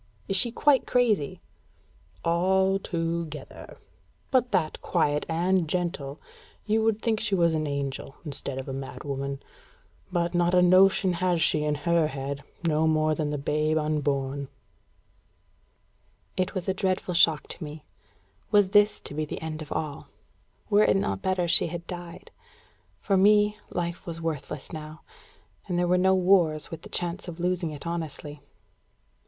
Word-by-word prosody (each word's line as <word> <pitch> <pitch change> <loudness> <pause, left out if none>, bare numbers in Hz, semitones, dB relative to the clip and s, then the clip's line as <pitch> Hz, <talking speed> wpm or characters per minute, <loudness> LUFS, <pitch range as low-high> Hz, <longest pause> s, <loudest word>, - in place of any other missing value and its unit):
"Is 195 - 0
she 230 +5 +3
quite 275 +1 +3
crazy?" 220 - +1 0.8
"Al 190 +3 +2
to 170 -2 -2
gether; 150 -2 -10 0.5
but 255 -2 +2
that 175 -6 0
quiet 145 0 0
and 175 0 +1
gentle, 165 -5 -2 0.5
you 220 +1 +2
would 220 -1 +1
think 225 -2 +1
she 205 -2 0
was 170 -2 +3
an 155 -1 -1
angel 140 -1 -4
instead 140 -2 -5
of 135 - -5
a 135 - -4
mad 135 0 -6
woman. 140 -1 -4 0.7
But 175 -1 0
not 175 0 +2
a 180 - +6
notion 185 +1 +5
has 175 0 +1
she 155 -1 +2
in 150 0 0
her 165 +2 +2
head, 140 -1 -5 0.3
no 160 0 +2
more 155 0 +2
than 155 -1 -1
the 150 - -2
babe 150 +2 0
unborn." 145 -3 -1 1.9
It 185 +2 -1
was 185 -1 -3
a 190 - +2
dreadful 185 -1 -1
shock 165 -3 +4
to - - -6
me. 150 +1 -8 0.6
Was 205 -3 +4
this 205 +1 +4
to - - -7
be 155 +1 -1
the - - -6
end 160 -1 -5
of 155 - -9
all? 150 -3 -4 0.6
Were 210 0 +4
it 195 - +4
not 95 - -1
better 185 -2 0
she 170 - +3
had 170 -1 -6
died? 175 -1 -8 0.7
For 195 -2 +2
me, 210 +2 +4
life 175 0 -4
was 165 -1 -5
worthless 150 -3 -5
now. 155 0 -8 0.7
And 180 -3 -1
there 175 0 +2
were 180 - +3
no 190 +1 +4
wars, 180 -5 +3
with 165 -1 -7
the - - -12
chance 175 +2 -3
of 175 -1 -7
losing 175 -1 0
it 150 0 -8
honestly. 155 -3 -5
170 Hz, 160 wpm, -27 LUFS, 150-185 Hz, 1.9 s, a